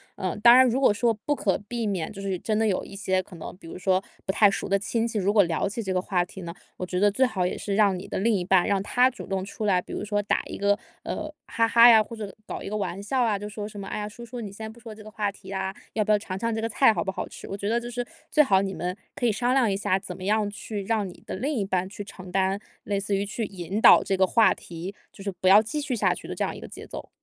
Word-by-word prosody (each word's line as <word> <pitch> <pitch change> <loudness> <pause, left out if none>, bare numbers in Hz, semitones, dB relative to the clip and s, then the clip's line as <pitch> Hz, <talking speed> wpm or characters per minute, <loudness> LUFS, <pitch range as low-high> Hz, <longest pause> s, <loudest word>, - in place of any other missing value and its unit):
嗯。 185 +2 -3
当 235 +1 +9
然 260 0 +7
如 255 +3 +1
果 260 - +6
说 230 +2 +2
不 285 +7 -2
可 195 - +1
避 235 -2 -2
免， 185 -6 -2
就 200 - -10
是 195 -2 -2
真 215 +3 -1
的 220 - +2
有 200 -4 +1
一 200 - -10
些 190 -1 0
可 185 -1 -14
能 165 - -8
比 165 - -13
如 - - -8
说 185 +1 +1 0.2
不 190 - -1
太 205 0 +6
熟 195 - -3
的 200 0 +2
亲 230 +3 -1
戚， 225 -2 -2
如 195 +1 +2
果 205 -2 +6
聊 170 +3 -1
起 225 +3 -4
这 190 -2 -2
个 185 - +1
话 180 -2 0
题 190 +1 -10
呢， 170 - -6 0.3
我 - - -5
觉 180 0 -1
得 205 0 +4
最 260 +6 +2
好 190 -8 +1
也 180 - -1
是 200 - -3
让 200 -3 +4
你 185 - -8
的 - - -4
另 225 +4 +2
一 185 -4 0
半， 185 -1 +4
让 200 -1 +2
他 250 +5 +3
主 - - -9
动 190 -1 -2
出 210 +2 -5
来， 190 -3 +3
比 - - -8
如 - - -3
说 205 0 -1
打 - - +1
一 - - -6
个， 200 0 +2 0.2
呃， 310 -1 -4
哈 230 0 +1
哈 235 +1 +8
呀， 225 -2 +8
或 230 - -9
者 210 -3 -7
搞 - - -5
一 - - -6
个 210 - -3
玩 200 -2 -3
笑 250 +6 0
啊， 220 -4 +2
就 205 +1 -6
说 210 0 -6
什 205 -1 -9
么， 195 - -6
哎 - - -4
呀， 210 - -4
叔 235 +3 -10
叔， 240 0 -7
你 205 - -6
先 220 +2 -8
不 235 - -17
说 225 -2 -10
这 215 - -12
个 215 - -11
话 205 -2 -1
题 190 -1 -13
啊， 190 -1 -2 0.2
要 215 - +1
不 215 - 0
要 210 - +6
尝 185 -2 -6
尝 230 +2 -1
这 - - -2
个 225 - -1
菜 230 +1 +4
好 - - -1
不 190 - -2
好 - - -5
吃？ - - -10
我 195 - -4
觉 200 +1 -3
得 235 +1 +2
就 240 0 -7
是 245 +1 -2 0.3
最 300 - +6
好 195 -6 +3
你 195 -1 -3
们 180 +2 -3 0.2
可 245 - 0
以 225 - +3
商 245 +4 0
量 255 -6 +3
一 195 - 0
下， 195 -1 +1
怎 - - -8
么 185 - -9
样 210 +1 +1
去 205 0 -6
让 215 0 0
你 180 - -12
的 - - -4
另 275 +10 -2
一 225 -7 0
半 185 -1 -1
去 205 +1 -7
承 185 -2 -11
担 190 +1 +1 0.3
类 200 -1 0
似 200 0 -1
于 195 - 0
去 215 +2 -3
引 195 +1 -4
导 - - +8
这 195 - 0
个 190 - +5
话 215 +1 +4
题， 175 +3 -8 0.2
就 - - -14
是 200 - -2
不 185 - +2
要 205 +2 +9
继 295 +7 -3
续 280 -3 -3
下 225 - +2
去 - - -10
的 - - -4
这 - - -1
样 - - -4
一 - - -9
个 - - -9
节 - - -10
奏。 - - -8
205 Hz, 345 characters per minute, -26 LUFS, 190-225 Hz, 0.3 s, 当